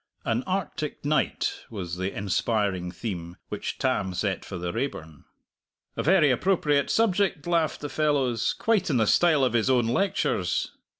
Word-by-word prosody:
"An 115 +2 +1
Arctic 175 -6 -3
Night" 150 +1 +1 0.2
was 90 -5 -5
the 95 +2 -2
inspiring 100 -2 -1
theme 90 -5 -6
which - - -4
Tam 95 -1 0
set 95 +1 -1
for 95 - -7
the 85 0 -4
Raeburn. 80 - -5 0.7
"A - - -1
very 165 -4 +4
appropriate 145 -2 +2
subject!" 200 -7 +1
laughed 170 -3 0
the 145 - -3
fellows; 140 -6 +1
"quite 215 -6 +1
in 135 - +2
the 110 - +3
style 155 +4 +4
of 125 -3 +2
his 120 +1 +2
own 125 -3 +3
lectures." 115 - 0
125 Hz, 155 wpm, -26 LUFS, 95-155 Hz, 0.7 s, very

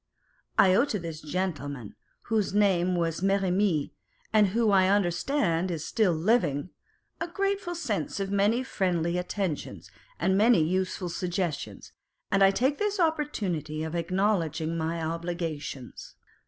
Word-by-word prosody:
I 185 -1 +6
owe 235 +8 +4
to 225 - -2
this 165 -4 -6
gentleman 145 - -4 0.3
(whose 215 -3 0
name 185 -3 +3
was 165 -1 -1
Merrimee, 195 -4 +1 0.4
and 210 -2 +5
who 220 +2 +2
I 190 -1 +5
understand 185 - +1
is 165 -3 -3
still 215 -5 +2
living,) 165 - +1 0.5
a 335 - -2
grateful 390 0 -2
sense 220 - -2
of 195 0 -2
many 205 +5 +2
friendly 180 -7 0
attentions 180 -3 -4 0.3
and 190 - +2
many 215 -3 +5
useful 185 +1 -1
suggestions, 175 -3 -3 0.4
and 195 - +3
I 195 - +7
take 260 +8 +1
this 415 -1 -1
opportunity 195 - -1
of 160 0 -4
acknowledging 170 -3 0
my 165 +1 -2
obligations. 165 -5 -5
185 Hz, 130 wpm, -28 LUFS, 165-210 Hz, 0.5 s, I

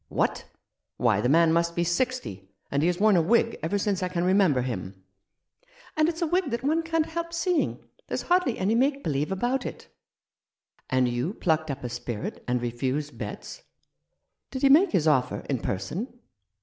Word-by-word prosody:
" - - -49
What! - - -1 0.5
Why, - - +2
the 125 - +1
man 165 +2 +5
must 170 0 +1
be 170 - +1
sixty, 175 - -2 0.2
and 140 - +1
he 160 - +3
has 175 0 0
worn 215 -1 +5
a 170 - +5
wig 230 +6 +2
ever 165 +6 0
since 200 -1 -1
I 180 - -1
can 175 -1 -1
remember 185 -8 +3
him! 95 -6 -5 0.4
" - - -27
"And 310 +1 +3
it's 335 +1 -3
a - - +3
wig 350 -1 0
that 235 0 -3
one 315 +4 +2
can't 325 -1 0
help 335 +1 -4
seeing. 340 0 -1 0.2
There's - - -3
hardly 355 -9 +2
any 195 +4 +1
make 275 +4 +1
believe 150 +2 -1
about 245 +7 0
it." - - -8 1.0
"And 130 -1 +2
you 125 - -2
plucked 160 -2 0
up 140 -1 -4
a 125 - -3
spirit 120 -2 -5
and 125 -1 0
refused 130 +5 -3
Betts? - - -7 0.9
Did 260 0 -6
he 275 - +6
make 335 +6 +6
his 160 - +2
offer 135 -5 +2
in 135 -3 -1
person 100 - -3
180 Hz, 190 wpm, -26 LUFS, -, 1.0 s, he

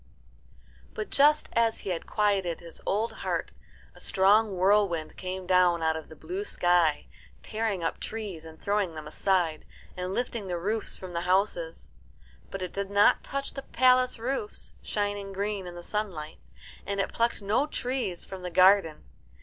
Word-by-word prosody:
] - - -27
But 215 - -4
just 300 +2 +5
as 230 -1 +2
he 195 - -3
had 170 - -4
quieted 200 -5 +1
his 170 -1 -11
old 215 +4 +1
heart - - -3 0.4
a - - -16
strong 200 +1 +3
whirlwind 185 -4 +2
came 185 0 -5
down 180 -2 +4
out 160 0 +2
of 160 - -7
the 160 - -11
blue 375 - -4
sky, 175 - +2 0.4
tearing 215 -5 -2
up 165 - -2
trees 205 -7 -5
and 160 -1 -12
throwing 200 -5 0
them 155 -1 -7
aside, 165 0 0 0.3
and 180 0 -3
lifting 230 -1 -2
the 175 -1 -2
roofs 210 +5 -2
from 185 -2 -8
the 170 - -1
houses. 205 - 0 0.6
But 195 -1 -5
it 180 - -5
did 200 0 -3
not 200 0 +4
touch 275 0 -3
the 275 - -5
palace 255 -1 +3
roofs, 270 - -3
shining 205 -1 -2
green 200 -1 -2
in 175 - -8
the 175 - -8
sunlight, 175 -7 -4 0.4
and 200 0 -3
it 195 - -1
plucked 230 -2 0
no 220 +9 +2
trees 250 - -3
from 190 -1 -8
the 180 - -4
garden. 185 -2 +5
195 Hz, 170 wpm, -28 LUFS, 175-220 Hz, 0.6 s, just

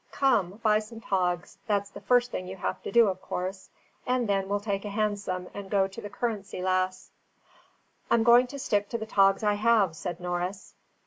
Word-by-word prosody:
Come, 220 -8 +1
buy 215 -1 +4
some 225 +1 -9
togs, 180 -4 -1
that's 200 -1 0
the - - -10
first 245 0 +3
thing 185 - -4
you 190 - -6
have 190 - -3
to - - -6
do 235 +2 +6
of 185 -1 -2
course; 185 +1 -5 0.4
and 250 -2 +1
then 195 -1 0
we'll 205 0 +1
take 200 -1 -2
a 210 - -4
hansom 200 -3 -2
and 200 -1 -7
go 195 -1 +2
to 195 - -9
the 205 - -7
Currency 210 -3 -3
Lass." 185 0 -1 1.0
"I'm 230 -1 +4
going 240 +2 +6
to 280 +3 -8
stick 205 -6 0
to 235 - -2
the 220 - -5
togs 195 -1 +3
I 210 -1 +3
have," 205 -5 +3
said 175 +1 -5
Norris. 180 +2 -4
200 Hz, 200 wpm, -28 LUFS, 185-220 Hz, 1.0 s, do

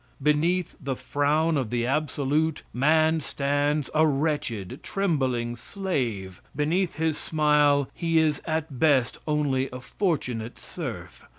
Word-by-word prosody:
Beneath 160 +5 +1
the 135 -1 -1
frown 150 +4 +1
of 130 -5 -1
the 120 0 0
absolute, 150 +2 0
man 155 +4 +3
stands 145 0 0
a 155 +1 +4
wretched, 140 - -1
trembling 130 -11 -1
slave 120 - -3
beneath 165 +5 0
his 160 -1 0
smile 150 -3 +3
be 165 -1 +2
is 155 -2 +2
at 155 -4 -2
best 135 -6 +3
only 140 -3 +1
a 125 - -6
fortunate 125 - -2
serf. - - -7
150 Hz, 120 wpm, -26 LUFS, 130-160 Hz, -, a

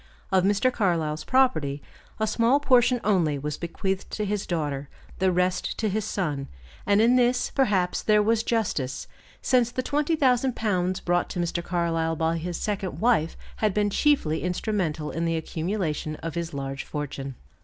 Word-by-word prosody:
Of 185 -1 +4
Mr. 205 +6 +2
Carlyle's 165 -8 0
property, 155 - +2 0.4
a 220 - +2
small 230 +5 +3
portion 250 -3 +4
only 170 -8 +2
was 150 +1 -4
bequeathed 190 +3 -3
to 210 - -1
his 205 0 -2
daughter, 145 -5 -2 0.3
the 190 0 +3
rest 180 +1 0
to 220 - 0
his 210 +1 -1
son; 150 -10 -2 0.4
and 200 0 +4
in 235 +3 +5
this, 245 0 +2
perhaps 200 -10 +1
there 210 -1 +4
was 225 +1 +2
justice, 155 - -1 0.4
since 245 -3 +3
the 255 +1 -3
20,000 275 -4 +1
pounds 185 -4 0
brought 175 0 0
to 180 - -4
Mr. 170 0 -1
Carlyle 165 -2 0
by 160 +1 0
his 175 +1 -4
second 200 -3 -3
wife 220 -9 +2 0.2
had 215 -3 0
been 205 -1 +2
chiefly 235 - +2
instrumental 180 -5 -2
in 165 +1 -2
the 165 0 0
accumulation 160 -2 -2
of 165 +1 -6
his 170 0 -3
large 135 0 -4
fortune. 140 -3 -5
185 Hz, 165 wpm, -26 LUFS, 160-220 Hz, 0.4 s, in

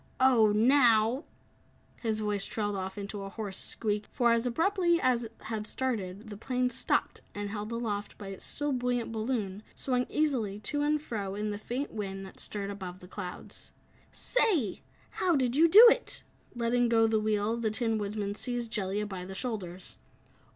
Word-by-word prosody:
"Oh, 245 -5 +5
now 235 +2 +4 0.4
" - - -34
His 220 -2 -1
voice 205 -2 -1
trailed 205 -2 -2
off 190 +1 -4
into 200 0 -5
a 195 - -5
hoarse 200 -1 -5
squeak, 210 -1 -2
for, 240 -1 +3
as 230 +1 +2
abruptly 345 +5 +2
as 245 -4 +2
it 225 - -10
had 215 -1 -4
started, 215 -5 -3
the 205 - -7
plane 250 +2 0
stopped, 245 - +1
and, 205 0 -4
held 210 +1 -4
aloft 215 -3 -3
by 200 -2 -8
its 195 - -8
still 290 0 -2
buoyant 245 -2 -1
balloon, 215 -3 -2
swung 250 -2 0
easily 250 -10 0
to 290 +7 -1
and 300 0 +1
fro 200 -7 -4
in 210 +1 -2
the 205 - -4
faint 255 +6 -4
wind 195 -2 -4
that 190 - -13
stirred 200 -1 -4
above 185 -3 -7
the 180 - -12
clouds. 180 0 -7 0.4
"Say! 390 - +1 0.4
how 355 -3 +3
did 255 -3 +1
you 325 +3 +6
do 420 +8 +10
it?" - - -1 0.3
Letting 240 0 +2
go 225 -1 +5
the 220 -1 +2
wheel, 215 +1 +1
the 230 -2 0
Tin 225 0 0
Woodman 205 0 -2
seized 240 +1 -3
Jellia 205 0 -1
by 190 -3 -6
the 190 +1 -7
shoulders. 190 -6 -4
220 Hz, 180 wpm, -30 LUFS, 205-250 Hz, 0.4 s, do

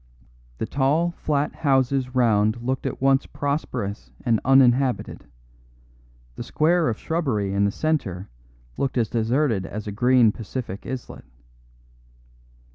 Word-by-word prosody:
The - - -2
tall, 145 +8 +1
flat 150 -3 -1
houses 135 -2 +1
round 110 -1 +2
looked 130 +2 -2
at - - -5
once 135 0 +3
prosperous 125 -8 -3 0.2
and 115 -3 +2
uninhabited; 130 -1 +3 1.1
the - - -7
square 165 +1 +1
of 110 - -2
shrubbery 125 - -1
in 100 0 +2
the 100 - +1
centre 105 - -2 0.5
looked 135 -1 -1
as 115 -3 +1
deserted 115 -1 +1
as 105 +2 -6
a 105 - -4
green 120 +1 +4
Pacific 110 -2 -6
islet. 130 - -7
125 Hz, 120 wpm, -23 LUFS, 110-140 Hz, 1.1 s, green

